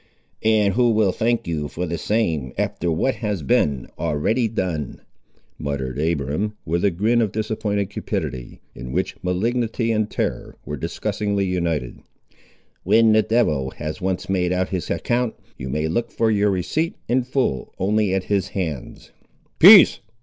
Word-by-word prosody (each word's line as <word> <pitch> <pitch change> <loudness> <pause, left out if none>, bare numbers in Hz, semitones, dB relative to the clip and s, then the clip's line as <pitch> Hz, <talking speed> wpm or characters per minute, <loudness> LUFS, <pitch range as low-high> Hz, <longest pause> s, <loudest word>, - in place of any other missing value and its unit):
"And 110 -3 +3
who 120 +2 +3
will 110 -4 +3
thank 115 +4 0
you 80 -3 -2
for 90 +4 -4
the 85 -1 -3
same, 80 - -1
after 85 0 -1
what 105 +12 0
has 105 -7 -3
been 70 -1 +1
already 110 +11 0
done?" 90 -9 -3 0.6
muttered 70 -2 -3
Abiram, 80 +7 -1
with 85 +2 -1
a 100 - +4
grin 110 +7 +1
of 110 -4 0
disappointed 105 -2 -2
cupidity, 65 -10 -4
in 65 +1 -8
which - - -1
malignity 115 +5 0
and 110 -1 0
terror - - -3
were 75 - -4
disgustingly 100 +8 -2
united; 85 -8 -2 0.8
"when 115 -1 +4
the 110 0 +5
devil 80 - +1
has 75 +1 -5
once 95 -1 -2
made 90 -2 0
out 90 0 0
his 90 -4 -3
account, 120 -1 -1 0.2
you 65 - -6
may 75 +4 -1
look 115 +9 -1
for 115 -1 +1
your 105 -1 +2
receipt 100 - -1
in 130 +2 +2
full 125 - -1
only 105 +1 +1
at 95 0 0
his 100 -1 0
hands." 80 -10 -5 0.5
"Peace!" - - +9
95 Hz, 155 wpm, -22 LUFS, 80-110 Hz, 0.8 s, Peace